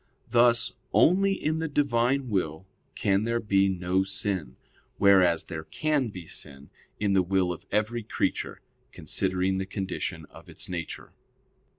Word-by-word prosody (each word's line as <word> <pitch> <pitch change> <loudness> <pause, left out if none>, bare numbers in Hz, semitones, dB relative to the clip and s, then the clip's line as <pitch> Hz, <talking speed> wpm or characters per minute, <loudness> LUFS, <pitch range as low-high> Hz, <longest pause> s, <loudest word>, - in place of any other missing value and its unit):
Thus 120 0 +4 0.2
only 195 +3 +4
in 155 -4 -1
the 160 - -1
Divine 135 -3 +1
will 90 -3 -1 0.3
can 100 +1 +1
there 115 +1 0
be 100 -3 +2
no 90 0 0
sin; 95 -8 -2 0.4
whereas 95 -5 +5
there 80 -3 -6
can 145 - 0
be 90 -5 -8
sin 70 -2 -7 0.3
in 100 -1 +1
the 95 - +5
will 90 0 +1
of 85 - -8
every 110 +3 0
creature; 105 - -2 0.3
considering 95 +4 -1
the 95 - -3
condition 95 -4 -4
of - - -14
its - - -5
nature. 85 -4 -6
95 Hz, 145 wpm, -27 LUFS, 90-120 Hz, 0.4 s, whereas